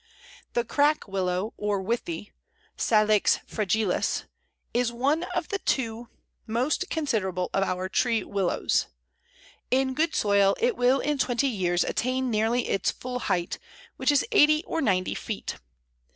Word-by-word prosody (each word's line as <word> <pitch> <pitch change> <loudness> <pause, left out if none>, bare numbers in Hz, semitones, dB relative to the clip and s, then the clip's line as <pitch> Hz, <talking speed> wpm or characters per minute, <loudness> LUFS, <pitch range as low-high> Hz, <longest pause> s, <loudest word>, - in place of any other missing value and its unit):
The 240 - +1
Crack 290 +4 +2
Willow 190 +1 -1
or 205 -1 -1
Withy 190 -3 -3 0.4
(Salix 215 -2 +3
fragilis) 210 -1 0 0.5
is 240 0 +1
one 280 +8 0
of 350 -3 -2
the 395 - -2
two 235 -6 -1 0.4
most 255 - 0
considerable 190 - -1
of 195 - +2
our 185 -1 -1
tree 230 +3 +1
Willows. 195 -3 0 0.8
In 260 +1 +2
good 320 +4 0
soil 200 -1 +3
it 480 -1 +2
will 255 0 +3
in 295 -1 -1
twenty 255 +2 +1
years 180 -6 +1
attain 255 +1 -1
nearly 225 +3 +1
its 195 - +1
full 250 0 -4
height, 180 -6 -1 0.4
which - - +2
is 285 - +3
eighty 305 +2 +5
or 325 - -2
ninety 185 -7 +1
feet. - - -5
230 Hz, 135 wpm, -26 LUFS, 195-270 Hz, 0.8 s, eighty